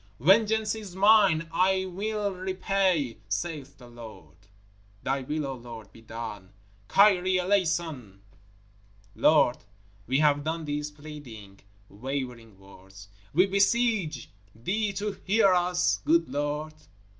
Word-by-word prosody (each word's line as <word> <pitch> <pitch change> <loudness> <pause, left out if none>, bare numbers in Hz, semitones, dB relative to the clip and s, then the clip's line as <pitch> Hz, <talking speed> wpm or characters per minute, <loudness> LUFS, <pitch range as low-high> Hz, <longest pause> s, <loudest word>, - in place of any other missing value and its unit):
Vengeance 215 - +3
is 210 -5 -8
mine; 195 -5 +4
I 190 +2 +2
mill 205 +2 -3
repay, 185 - -1
saith 140 +6 -4
the 125 - -14
Lord! 110 -10 -13 0.7
Thy 135 +1 -1
will, 150 +3 -3
O 135 - -4
Lord, 115 -4 -11
be 115 - -16
done! 105 -4 -8 0.3
Kyrie 190 -2 +4
Eleison! 165 - -1 0.9
Lord, 150 -5 +4 0.5
we 130 +3 +1
have 145 -1 +3
done 160 +1 -3
these 150 0 -3
pleading, 145 -10 -11 0.3
wavering 120 -2 -6
words. 95 +1 -15 0.3
_We 185 +3 +4
beseech 200 - +1 0.2
Thee 200 - -1
to 205 +2 -3
hear 200 -1 +4
us, 180 0 +1
good 330 +2 +3
Lord! 150 +2 -3
155 Hz, 115 wpm, -27 LUFS, 120-190 Hz, 0.9 s, mine